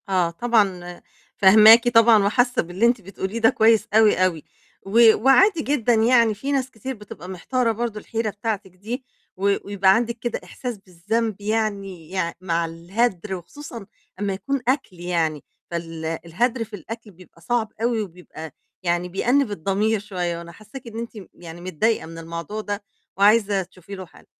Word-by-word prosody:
آه، 180 -3 +2
طبعًا، 185 -3 0 0.4
فهماكِ 215 +4 +8
طبعًا، 230 -2 +6
وحاسّة 245 +4 +2
باللي 175 +6 -1
أنتِ 235 -1 +2
بتقوليه 195 +3 -5
ده 225 +1 +5
كويس 225 -3 +3
أوي، 220 -1 +5
أوي، 165 -4 -2 0.4
و 220 +2 +6
وعادي 330 +7 +5
جدًا 260 -5 +1
يعني، 230 0 +4
في 270 +8 -4
ناس 265 -2 -1
كتير 260 +4 -6
بتبقى 205 -4 -11
محتارة 230 +6 -1
برضه 225 -1 -3
الحيرة 225 +1 -3
بتاعتِك 205 -2 -4
دي، 225 +8 -6 0.3
و 200 +1 +2
ويبقى 195 -1 +3
عندِك 235 0 -1
كده 240 +1 -3
إحساس 245 -4 -6
بالذنب، 200 +4 -3
يعني 200 -5 -2
يع 170 -3 -1
مع 170 -2 0
الهدر، 190 +4 -2
وخصوصًا 230 - -9 0.3
أمّا 200 -1 -1
يكون 275 +8 -3
أكل 255 -9 -1
يعني. 165 -4 -1 0.3
فال 165 -1 -5
الهدر 180 +10 -1
في 220 -1 -9
الأكل 220 +3 -9
بيبقى 180 -2 -19
صعب 230 +1 -1
أوي، 230 -1 +1
وبيبقى 170 -4 -9 0.3
يعني 175 0 0
بيأنّب 245 +6 +1
الضمير 205 +4 0
شوية، 180 -4 -3
وأنا 170 0 -9
حسّاكِ 215 +8 -12
إن 225 0 -7
أنتِ 235 0 -5 0.2
يعني 170 0 -11
متضايقة 185 +5 0
من 165 +1 -10
الموضوع 170 +6 -6
ده، 205 0 -4 0.3
وعايزة 205 -1 +4
تشوفي 185 +2 -12
له 190 -1 -8
حَل. - - -20
205 Hz, 160 wpm, -23 LUFS, 180-230 Hz, 0.4 s, فهماكِ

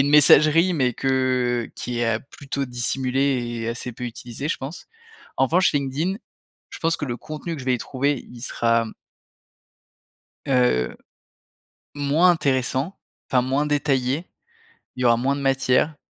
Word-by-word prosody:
une 140 - 0
messagerie 155 +4 +7
mais 130 -6 +1
que 130 -2 0
qui 120 -1 -4
est 115 -2 +1
plutôt 140 -1 -4
dissimulée 125 -1 -1
et 115 - -2
assez 120 +1 -5
peu 125 - -7
utilisée, 120 +4 -6
je - - 0
pense. 140 +6 -8 0.5
En 135 - +4
revanche, 180 +7 +3
LinkedIn, 145 +7 -1 0.5
je - - -9
pense 165 0 +1
que 150 - -4
le 120 -3 -3
contenu 155 +4 -6
que 140 - -7
je 130 - -9
vais 125 - +3
y - - -2
trouver, 140 +2 -2
il 120 -1 -11
sera 115 -2 +1 1.6
heu, 125 - +2 1.0
moins 145 +5 +3
intéressant, 135 +1 0 0.3
enfin, 125 -1 +3
moins 135 +3 0
détaillé. 140 +1 0 0.7
Il 125 - -6
y - - +1
aura 115 -1 +5
moins 135 +3 0
de 140 - -5
matière 135 +2 +2
135 Hz, 155 wpm, -23 LUFS, 125-145 Hz, 1.6 s, messagerie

